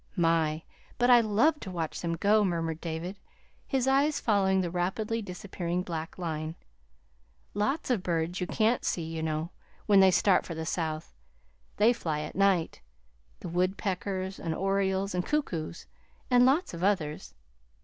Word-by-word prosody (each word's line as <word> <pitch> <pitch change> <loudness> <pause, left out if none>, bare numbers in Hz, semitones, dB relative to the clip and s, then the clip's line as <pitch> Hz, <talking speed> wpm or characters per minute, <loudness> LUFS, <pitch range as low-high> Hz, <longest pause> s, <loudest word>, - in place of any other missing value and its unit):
"My! 165 -3 +1 0.3
but 245 0 +4
I 240 -1 +8
love 230 +9 +2
to 190 - -7
watch 165 -3 -4
them 170 -1 -1
go," 210 +5 +3
murmured 165 -3 -1
David, 170 +4 -5 0.5
his 265 -2 0
eyes 280 +2 +3
following 190 -3 +2
the 175 -2 -2
rapidly 210 +6 -1
disappearing 180 -2 -4
blackline. 160 -1 -4 1.0
"Lots 235 +8 -1
of 230 -6 +1
birds 175 0 -1
you 180 - -1
can't 225 +5 +1
see, 170 - -1
you 160 0 -4
know, 160 +1 -2 0.3
when 205 -2 +5
they 190 0 +7
start 185 +1 +3
for 165 - -6
the 160 0 -4
South. 160 -1 -3 0.6
They 220 +4 +5
fly 155 -9 -3
at - - -6
night 195 -4 +2 0.6
the - - -6
woodpeckers 190 +1 -2
and 165 -1 -3
orioles 195 +1 0
and 180 0 0
cuckoos, 175 - -2 0.5
and 245 0 +6
lots 300 - +2
of 170 +1 -5
others. 165 -7 -1
185 Hz, 150 wpm, -29 LUFS, 165-210 Hz, 1.0 s, I